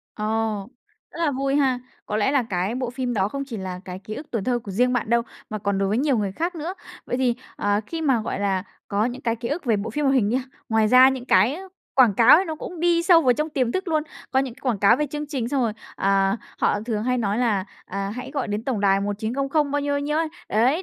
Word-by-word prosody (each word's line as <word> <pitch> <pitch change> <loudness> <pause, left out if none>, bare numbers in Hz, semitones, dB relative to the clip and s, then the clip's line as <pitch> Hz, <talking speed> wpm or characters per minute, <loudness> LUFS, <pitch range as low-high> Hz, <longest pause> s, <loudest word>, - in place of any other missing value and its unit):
Ồ! 210 - -4 0.9
Rất - - -11
là 300 - +2
vui 275 0 0
ha! 265 -3 +2 0.3
Có 210 - -2
lẽ 215 +5 +2
là 280 -3 +3
cái 195 -1 -2
bộ 255 -1 -2
phim 250 0 -3
đó 195 -1 +1
không 275 +4 -4
chỉ 235 - -6
là 185 -2 -5
cái 180 0 -6
ký 215 +2 -7
ức 300 - -7
tuổi 225 -5 -2
thơ 245 +1 +1
của 220 -4 -9
riêng 250 +6 +2
bạn 235 -2 -1
đâu, 235 0 +4 0.3
mà 215 - -3
còn 200 -1 -1
đối 195 - +1
với 210 +4 +1
nhiều 275 -1 +2
người 200 -2 -1
khác 340 - -2
nữa. 335 +3 -4 0.3
Vậy - - -1
thì, 250 -2 +2 0.2
ờ, 205 0 +1
khi 330 +4 -4
mà, 265 -6 +3
gọi 220 - -3
là, 195 -2 0 0.3
có 205 +1 +1
những 245 +2 -4
cái 230 -1 0
ký 235 +1 -5
ức 305 +4 -3
về 230 -4 +2
bộ 205 +3 -3
phim 295 +6 -2
hoạt 270 -1 +3
hình 220 -6 +3
nha, 245 - +1 0.3
ngoài 220 -2 +3
ra 255 +3 +8
những 260 -2 -3
cái, 220 +2 +4
ơ, 380 +4 -9 0.3
quảng 245 -6 +5
cáo 230 +7 +8
ấy 370 - +2
nó 320 - -4
cũng 330 +2 -8
đi 340 0 +3
sâu 340 -1 +6
vào 255 -3 +5
trong 300 +6 -2
tiềm 255 -5 0
thức 375 -1 -2
luôn. 310 -2 +1 0.3
Có 265 - +2
những 265 -3 -4
cái - - -20
quảng 245 -6 0
cáo 200 +4 +5
về 300 +2 0
chương 295 +1 -5
trình, 260 -5 -2
xong 270 0 +1
rồi, 230 -3 0 0.2
ờ, 195 0 +2 0.2
họ 205 - +2
thường 215 -3 -1
hay 250 0 +1
nói 210 -2 0
là, 215 -6 +1 0.2
à, 195 +1 -4
"Hãy 250 +2 -6
gọi 275 -4 -2
đến 205 +2 -3
tổng 245 -6 -1
đài 195 -1 +3
1900" 265 +9 -1
bao 290 +1 0
nhiêu, 285 0 -1
bao 285 - 0
nhiêu 295 +1 -1
ấy. 325 0 0 0.2
Đấy, 255 - +2
245 Hz, 275 wpm, -23 LUFS, 210-280 Hz, 0.9 s, ra